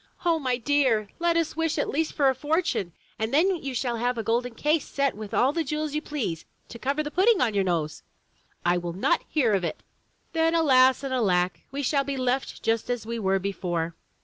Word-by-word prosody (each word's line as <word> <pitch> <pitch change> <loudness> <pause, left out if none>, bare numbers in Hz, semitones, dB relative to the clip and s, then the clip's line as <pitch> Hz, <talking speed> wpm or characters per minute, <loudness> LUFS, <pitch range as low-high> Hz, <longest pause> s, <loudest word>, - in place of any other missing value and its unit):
"O 335 -2 +3
my 255 -4 0
dear! 250 -5 +2
let 340 0 +2
us 330 -2 0
wish 325 0 0
at 290 - 0
least 315 +2 -1
for 280 -3 +2
a 265 - +4
fortune, 295 - -1 0.3
and 220 +1 -1
then 350 +6 +3
you 275 -5 -5
shall 240 -1 -1
have 245 +1 -1
a 225 - -2
golden 235 +2 -1
case 300 +4 +1
set 280 -1 0
with 210 -1 -8
all 265 +3 +3
the 330 - 0
jewels 300 0 -3
you 305 - -1
please, 235 - -3 0.3
to 235 - -9
cover 280 +5 -1
the 295 - -5
pudding 390 +5 +4
on 230 -4 +2
your 200 -1 +2
nose!" 165 -4 -1 0.6
l 175 0 +3
will 170 -1 -4
not 185 - +1
hear 250 -9 +2
of 195 -2 +1
it!" 165 - -4 0.5
"Then, 325 0 +2
alas 265 -5 +5
and 270 -1 -3
alack, 185 -7 +1
we 280 +1 -4
shall 275 +1 +2
be 275 0 -3
left 255 +1 -2
just 225 +1 0
as 245 -3 -2
we 230 +1 -4
were 195 -2 +2
before!" 175 -4 -2
255 Hz, 220 wpm, -26 LUFS, 215-300 Hz, 0.6 s, alas